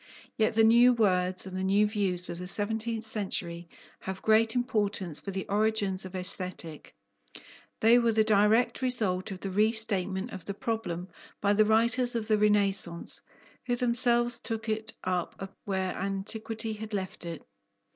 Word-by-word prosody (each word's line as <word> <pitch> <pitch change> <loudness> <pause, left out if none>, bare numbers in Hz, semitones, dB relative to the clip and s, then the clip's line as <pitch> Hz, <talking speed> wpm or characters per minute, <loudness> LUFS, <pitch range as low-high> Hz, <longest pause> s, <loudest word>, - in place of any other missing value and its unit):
Yet 215 -1 +1
the 225 - +5
new 235 +3 +6
words 185 -5 +1
and 190 -1 -7
the 185 - -2
new 200 +2 +3
views 195 -4 -1
of 170 - -6
the 180 - -6
seventeenth 220 +3 -3
century 180 -6 -2 0.3
have 190 0 -6
great 220 +1 +3
importance 205 - +2
for - - -7
the 190 -1 -4
origins 205 -2 0
of 185 0 -9
Aesthetic; 180 - -6 0.9
they 230 +2 +6
were 235 -1 +2
the 220 0 +3
direct 215 +4 +3
result 215 -8 0
of 190 -2 -7
the 195 - -4
restatement 210 -1 0
of 190 -5 -8
the 200 - -4
problem 190 -6 -3 0.3
by 200 0 +2
the 215 +1 +4
writers 235 +3 +2
of 225 -2 -2
the 215 -1 +3
Renaissance, 200 -5 +1 0.5
who 245 - +1
themselves 240 -1 +3
took 225 0 -4
it 220 +1 -2
up 185 +1 -3
where 190 -2 -1
Antiquity 215 +3 -4
had 215 0 -6
left 190 -2 -5
it. 170 -2 -7
210 Hz, 155 wpm, -28 LUFS, 190-225 Hz, 0.9 s, new